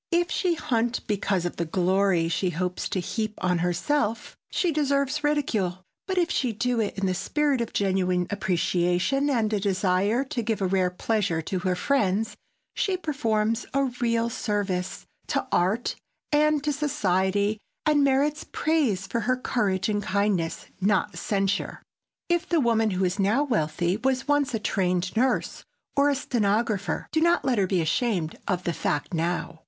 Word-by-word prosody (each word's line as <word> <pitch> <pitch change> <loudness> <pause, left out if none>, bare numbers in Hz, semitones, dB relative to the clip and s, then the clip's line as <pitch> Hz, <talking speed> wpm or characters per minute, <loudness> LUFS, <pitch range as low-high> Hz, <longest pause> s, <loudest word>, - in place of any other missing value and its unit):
If 345 0 +1
she 360 -3 +1
hunt 240 -5 -1
because 195 -3 0
of 175 - -4
the 170 - -1
glory 185 0 +2
she 180 +2 0
hopes 180 +1 -2
to 190 - -1
heap 215 +4 -3
on 180 -1 0
herself, 210 - -1
she 355 - +1
deserves 285 -1 0
ridicule, 215 -12 0 0.2
but 380 -1 -2
if 345 -1 +2
she 250 -4 0
do 245 +2 0
it 210 -2 -1
in 195 - 0
the 185 - +1
spirit 285 +7 0
of 235 - -3
genuine 185 -2 +1
appreciation 180 +7 +1
and 225 -5 +1
a 210 - +2
desire 195 +4 +1
to 260 -3 -3
give 225 -1 -1
rare 185 -1 +3
pleasure 190 -2 0
to 185 +3 -2
her 180 0 0
friends 215 -2 +1 0.4
she 385 -2 0
performs 230 -9 -1
a 275 - +3 0.2
real 230 -1 +2
service 200 -5 -2 0.2
to - - 0
art 195 +7 +1 0.4
and 300 0 +3
to 300 -1 0
society 205 -7 0 0.3
and 300 -2 +4
merits 280 +3 +2
praise 275 - +1
for 200 +4 -2
her 255 +2 +1
courage 200 -7 0
and 205 -1 0
kindness, 200 -4 0 0.2
not 200 0 +1
censure. 200 -1 -1 0.4
If 345 +1 0
the 340 - +3
woman 225 -4 +2
who 185 -1 0
is 185 +3 -1
now 215 +9 +3
wealthy 175 - 0
was 260 +3 0
once 290 -4 +2
a - - -1
trained 185 -2 0
nurse 250 +2 0 0.3
or 285 +1 +4
a 285 - +2
stenographer, 215 -5 0
do 315 - +1
not 340 +1 +3
let 250 -5 +2
her 190 - +2
be 180 -2 +1
ashamed 170 0 0
of 180 -2 -1
the 170 - -1
fact 150 +1 -2
now. 170 0 -2
210 Hz, 165 wpm, -26 LUFS, 185-270 Hz, 0.4 s, and